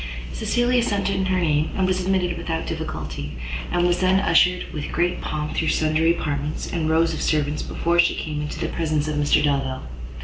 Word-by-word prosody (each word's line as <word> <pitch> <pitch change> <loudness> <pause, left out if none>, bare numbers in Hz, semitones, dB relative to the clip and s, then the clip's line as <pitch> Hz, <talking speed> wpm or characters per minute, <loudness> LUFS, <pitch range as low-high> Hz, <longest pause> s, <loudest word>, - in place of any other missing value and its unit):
Cecilia 240 - +1
sent 200 -3 0
in 190 -1 0
her 185 0 +1
name 155 -2 +1
and 190 - +2
was 185 0 +1
admitted 185 -1 0
without 165 -1 -3
difficulty, 70 +1 -5 0.4
and 175 0 +2
was 175 0 +2
then 185 +1 +3
ushered 180 0 +3
with 150 -1 -5
great 175 +2 0
pomp 150 0 -3
through 160 - -1
sundry 160 +2 +2
apartments, 145 0 -3
and 160 -2 0
rows 165 +1 +3
of - - -4
servants, 150 -1 0
before 170 +1 0
she 170 0 +4
came 150 -1 -4
into 150 - -5
the 165 - -1
presence 155 -2 -1
of 155 - -2
Mr 145 0 +3
Delvile. 135 -3 0
165 Hz, 195 wpm, -23 LUFS, 150-180 Hz, 0.4 s, she